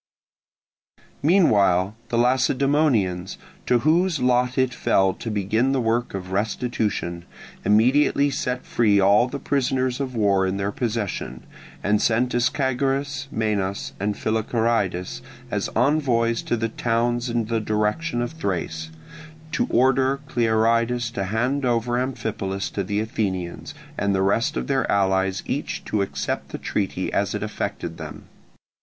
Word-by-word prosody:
Meanwhile 105 - +3
the 120 - 0
Lacedaemonians, 125 - +2 0.3
to 125 - +4
whose 170 0 +3
lot 125 0 +2
it 130 -1 +2
fell 95 -5 +2
to 115 - -6
begin 110 +5 +1
the 135 - +1
work 115 -1 0
of 95 -1 -6
restitution, 105 -4 -2 0.4
immediately 140 +6 +3
set 125 -2 -2
free 105 -4 +3
all 100 +5 +5
the 135 +3 -5
prisoners 130 -2 0
of 130 -3 -3
war 100 -3 +2
in 95 +1 -2
their 100 0 -1
possession, 105 - -3 0.4
and 105 0 +2
sent 120 +2 +2
Ischagoras, 135 +2 0
Menas, 105 -4 -2
and 105 +1 -1
Philocharidas 110 -4 -1 0.3
as - - -1
envoys 120 -3 +2
to 120 - -1
the 115 0 -1
towns 120 +2 0
in 115 -1 0
the 115 +1 -1
direction 110 +6 -1
of 120 - -4
Thrace, 85 - -3 0.6
to 245 - 0
order 130 +2 +3
Clearidas 115 +1 +1
to 100 -5 -2
hand 125 +8 0
over 120 0 +1
Amphipolis 105 -6 -3
to 100 - -2
the 100 +3 -1
Athenians, 100 +2 -3 0.2
and 100 -1 +1
the 95 - +1
rest 100 +4 +1
of 60 - -2
their - - 0
allies 95 -1 +1
each - - -3
to 105 - 0
accept 100 - -3
the - - -5
treaty - - -2
as - - 0
it - - -3
affected - - -4
them. - - -8
115 Hz, 135 wpm, -23 LUFS, 100-125 Hz, 0.6 s, all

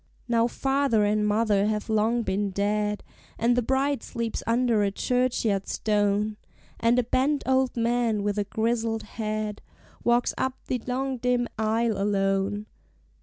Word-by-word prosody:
Now 235 -1 +3
father 270 -4 +1
and 210 0 +1
mother 210 -1 +2
have 215 -1 -2
long 225 +2 +1
been 200 0 -1
dead, 210 +1 -1 0.3
And 235 +2 +2
the 245 - +2
bride 270 +2 0
sleeps 230 -1 -4
under 230 -2 +2
a 200 - +2
churchyard 230 -3 0
stone, 210 0 0 0.4
And 230 +2 +3
a 250 - +3
bent 270 +5 +1
old 260 -1 +1
man 230 -2 +1
with 205 0 -1
a - - +2
grizzled 225 +1 -1
head 215 -1 -4 0.4
Walks 240 0 +2
up 260 0 -1
the 250 -2 -2
long 260 +1 -1
dim 245 0 +1
aisle 220 -1 +1
alone. 200 0 0
225 Hz, 145 wpm, -26 LUFS, 210-245 Hz, 0.4 s, Now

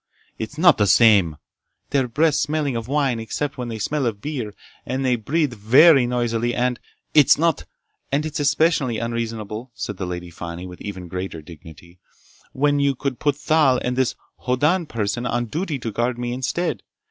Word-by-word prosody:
"It's 110 +7 -6
not 175 -4 +5
the 105 - +3
same—" 100 -8 +5 0.6
"Their 135 -3 +2
breaths 150 +6 +2
smelling 145 -2 -1
of 115 -1 -4
wine 135 -4 0
except 140 +5 -4
when 125 - -3
they 115 -1 -5
smell 135 +5 -1
of 105 -3 -3
beer, 120 -6 -5 0.3
and 130 +1 -3
they 125 -1 +3
breathe 140 +4 -1
very 130 +6 +6
noisily 120 -1 -1
and—" 125 0 0 0.3
"It's 150 -3 +6
not—" 165 0 +1 0.5
"And 145 +3 +1
it's 155 0 -4
especially 145 -4 +2
unreasonable," 115 0 -4
said 105 -5 -5
the 95 - -4
Lady 90 -1 -6
Fani 85 +1 -7
with 90 -1 -10
even 95 -3 -7
greater 90 -2 -5
dignity, 85 +2 -14 0.5
"when 145 +1 +1
you 140 -1 +2
could 135 -1 -3
put 145 -2 +1
Thal 150 -3 +3
and 125 0 -1
this—Hoddan 130 +6 -1
person 115 +1 -2
on 120 0 -1
duty 155 - -3
to 115 -3 -5
guard 120 +3 -1
me 120 0 -3
instead. 130 - -2
125 Hz, 170 wpm, -22 LUFS, 110-145 Hz, 0.6 s, very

